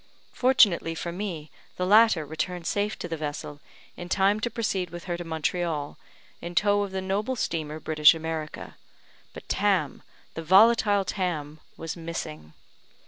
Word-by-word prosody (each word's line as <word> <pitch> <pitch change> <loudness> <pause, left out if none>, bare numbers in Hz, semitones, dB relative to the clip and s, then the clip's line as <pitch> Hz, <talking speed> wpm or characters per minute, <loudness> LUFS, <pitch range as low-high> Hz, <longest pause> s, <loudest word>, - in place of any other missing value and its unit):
Fortunately 210 -10 +3
for 170 +1 -4
me, 170 -5 -5 0.3
the 180 - -1
latter 210 -5 +5
returned 170 +3 -4
safe 205 +5 -1
to - - -6
the 165 -1 -4
vessel, 145 -1 -5 0.4
in 175 0 -8
time 200 +3 +2
to 240 - -2
proceed 210 -6 -2
with 175 +1 -9
her 175 -2 -3
to 175 - -6
Montreal, 160 -2 -2 0.5
in 175 0 -7
tow 205 +1 +3
of 200 - -2
the 190 0 -4
noble 205 +7 -1
steamer, 155 -8 -3
British 155 0 +5
America; 160 -1 -6 0.5
but - - -12
Tam, 190 -9 0 0.3
the 165 - -5
volatile 205 +3 +5
Tam 155 -6 -3 0.2
was 165 -1 -5
missing. 80 - -7
175 Hz, 150 wpm, -26 LUFS, 160-200 Hz, 0.5 s, latter